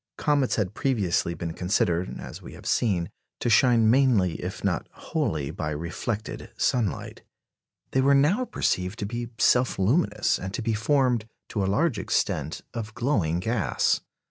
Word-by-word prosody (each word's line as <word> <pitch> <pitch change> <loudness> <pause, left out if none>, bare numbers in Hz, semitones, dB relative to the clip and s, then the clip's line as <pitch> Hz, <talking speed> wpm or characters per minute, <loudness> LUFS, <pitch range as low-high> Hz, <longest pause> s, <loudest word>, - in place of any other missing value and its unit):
Comets 145 -4 +2
had 105 -3 -1
previously 100 - 0
been 85 -1 -4
considered, 90 -1 0
as - - -8
we - - -10
have - - -13
seen, 95 -8 +1 0.3
to 120 - 0
shine 115 0 +5
mainly, 115 -8 +4
if - - -5
not - - 0
wholly, 75 -2 -2
by 80 -2 -3
reflected 85 +8 -4
sunlight. 115 -7 -1 0.7
They 130 - +2
were 140 +1 +5
now 165 - +3
perceived 95 - -1
to 100 - -3
be 120 +2 -4
self 125 +2 +3
luminous, 105 - +2
and 95 +1 -5
to 120 - -3
be 115 - 0
formed, 120 -1 +1 0.2
to 105 - -1
a 95 - 0
large 135 +1 +1
extent, 80 -5 -1
of 110 -2 -5
glowing 105 - +1
gas. 115 +5 +1
110 Hz, 155 wpm, -26 LUFS, 90-125 Hz, 0.7 s, shine